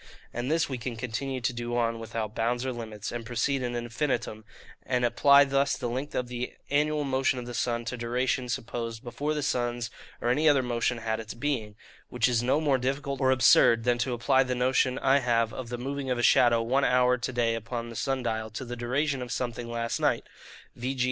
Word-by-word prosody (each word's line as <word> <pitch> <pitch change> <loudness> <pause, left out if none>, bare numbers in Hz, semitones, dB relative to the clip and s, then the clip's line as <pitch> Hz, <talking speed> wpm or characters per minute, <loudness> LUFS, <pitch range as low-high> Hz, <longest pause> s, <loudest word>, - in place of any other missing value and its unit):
And 120 +2 -3
this 165 +1 +2
we 130 -3 -4
can 120 +1 -4
continue 125 +3 -3
to 120 +1 0
do 120 0 -3
on, 115 -1 0
without 115 -1 -4
bounds 120 +3 -1
or 130 - -2
limits, 110 -3 -6
and 120 -1 -4
proceed 125 +4 -1
in 120 -1 -2
infinitum, 120 -2 -2 0.4
and 125 -1 0
apply 140 +4 +6
thus 140 0 +1
the 120 - -3
length 130 +4 -4
of 125 - -1
the 125 0 -5 0.2
annual 150 +1 +2
motion 130 -1 +1
of 125 - -5
the 120 - -7
sun 120 0 -1
to 125 +1 -4
duration, 125 +1 -1
supposed 115 -2 -4
before 145 +5 -3
the 150 - -2
sun's 120 -3 -1 0.3
or 120 - -1
any 150 +6 +4
other 140 -3 +4
motion 120 0 0
had 110 -1 -2
its 110 0 -7
being, 120 -5 -2 0.3
which 125 -1 +2
is 120 -2 +2
no 130 +5 +2
more 145 -4 +2
difficult 135 +2 -2
or 130 - +3
absurd, 120 -2 +5
than 120 0 +1
to 125 +1 0
apply 130 +3 +3
the 130 -1 0
notion 130 +1 +2
I 135 +1 +3
have 115 -3 +1
of 125 -3 -6
the 120 - -4
moving 135 +2 -4
of 125 - 0
a 120 - -1
shadow 120 -1 +5
one 130 +4 +1
hour 125 -1 +3
to 125 +2 -3
day 120 -2 +1
upon 115 +1 -4
the 115 - -9
sun 135 +2 -1
dial 110 -2 -2
to 110 +4 -6
the 120 0 -5
duration 130 +3 -1
of 125 -1 -6
something 120 -1 -3
last 115 0 -2
night, - - +1 0.5
v. 130 +3 -3
g. - - -9
125 Hz, 220 wpm, -28 LUFS, 115-130 Hz, 0.5 s, apply